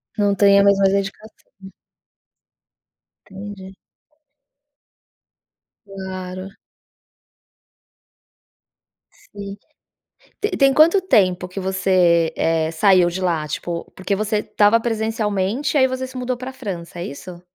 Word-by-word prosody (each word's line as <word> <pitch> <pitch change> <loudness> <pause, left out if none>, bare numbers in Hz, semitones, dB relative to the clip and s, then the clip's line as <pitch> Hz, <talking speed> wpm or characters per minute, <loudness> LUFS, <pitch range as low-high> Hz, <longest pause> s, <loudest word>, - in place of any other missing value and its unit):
Não 205 -2 +1
tem 200 0 +5
a - - +5
mesma 200 -1 +4
dedicação. 195 0 -4 1.5
Entendi. 195 -1 -10 2.1
Claro. 185 -1 -7 2.9
Sim. 200 0 -7 0.8
Te 415 - -1
tem 275 -1 +4
quanto 335 +6 +5
tempo 190 - +2
que 190 +2 -6
você 185 -3 +2
eh, 160 -1 0
saiu 185 0 +4
de 180 +2 -4
lá? 165 -4 -1
Tipo, 170 +3 -5
porque 190 +1 -2
você 215 +1 -1
estava 210 +2 +2
presencialmente 220 +3 -1
e - - +5
aí 260 - +5
você 260 0 -4
se 260 - -12
mudou 255 0 -2
para 255 +2 -7
França, 180 -9 -7
é 175 - -4
isso? 175 +5 -9
195 Hz, 110 wpm, -20 LUFS, 185-220 Hz, 2.9 s, tem